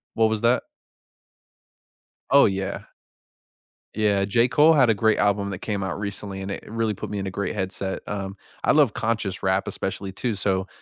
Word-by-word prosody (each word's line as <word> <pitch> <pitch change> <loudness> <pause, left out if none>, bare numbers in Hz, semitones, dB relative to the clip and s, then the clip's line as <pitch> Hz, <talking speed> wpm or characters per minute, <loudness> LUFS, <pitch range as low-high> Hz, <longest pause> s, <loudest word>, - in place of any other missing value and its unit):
What 110 -1 +4
was 110 -1 -1
that? 120 +2 +3 1.7
Oh, 140 0 +7
yeah. 95 -1 -2 1.1
Yeah, 105 -2 +2
J. 115 +5 +2
Cole 155 +4 +6
had 130 -6 +5
a - - +5
great 110 +2 +2
album 100 -1 +1
that 95 - -5
came 105 -3 -3
out 95 0 -3
recently, 100 -1 -5
and 95 +1 -5
it - - -7
really 110 -1 -1
put 100 - -7
me 105 - -4
in 95 0 -3
a - - -4
great 100 +2 -3
headset, 95 0 -3
um, 100 -1 -4 0.3
I - - +4
love 145 -8 +4
conscious 110 -4 -2
rap 95 0 +1
especially 95 0 -4
too, 110 +3 -2
so 95 -1 -1
100 Hz, 185 wpm, -24 LUFS, 95-110 Hz, 1.7 s, Oh